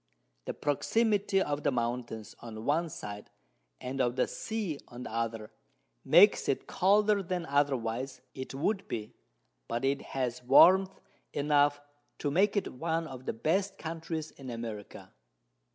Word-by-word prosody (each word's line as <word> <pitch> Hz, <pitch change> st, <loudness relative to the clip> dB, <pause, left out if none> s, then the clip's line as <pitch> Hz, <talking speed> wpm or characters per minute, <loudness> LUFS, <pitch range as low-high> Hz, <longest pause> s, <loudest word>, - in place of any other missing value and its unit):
The -, -, -4 dB
Proximity 200 Hz, -, +1 dB
of 145 Hz, 0 st, -2 dB
the -, -, +1 dB
Mountains 120 Hz, -2 st, -3 dB
on 110 Hz, -1 st, -8 dB
one 165 Hz, +3 st, +1 dB
side, 105 Hz, -7 st, -8 dB, 0.5 s
and 130 Hz, +1 st, -3 dB
of 120 Hz, -1 st, +1 dB
the 130 Hz, -, +2 dB
Sea 205 Hz, -10 st, -4 dB
on 120 Hz, +1 st, -9 dB
the -, -, -7 dB
other, 115 Hz, -1 st, -3 dB, 0.5 s
makes -, -, +6 dB
it -, -, 0 dB
colder 205 Hz, +2 st, +3 dB
than 180 Hz, -2 st, -3 dB
otherwise 135 Hz, -3 st, 0 dB
it 130 Hz, 0 st, -7 dB
would 195 Hz, +8 st, -1 dB
be; 105 Hz, -2 st, -5 dB, 0.5 s
but 120 Hz, +3 st, -2 dB
it 140 Hz, +1 st, +1 dB, 0.2 s
has 125 Hz, -2 st, -1 dB
Warmth 185 Hz, +9 st, +6 dB, 0.3 s
enough 145 Hz, 0 st, +3 dB, 0.4 s
to 145 Hz, -, -2 dB
make 200 Hz, +6 st, +3 dB
it 200 Hz, -, -1 dB
one 165 Hz, +4 st, -1 dB
of 130 Hz, -4 st, -9 dB
the -, -, 0 dB
best 190 Hz, -, 0 dB
Countries 160 Hz, -1 st, -5 dB
in 135 Hz, -2 st, -10 dB
America. 115 Hz, -3 st, -7 dB
140 Hz, 145 wpm, -30 LUFS, 120-175 Hz, 0.5 s, makes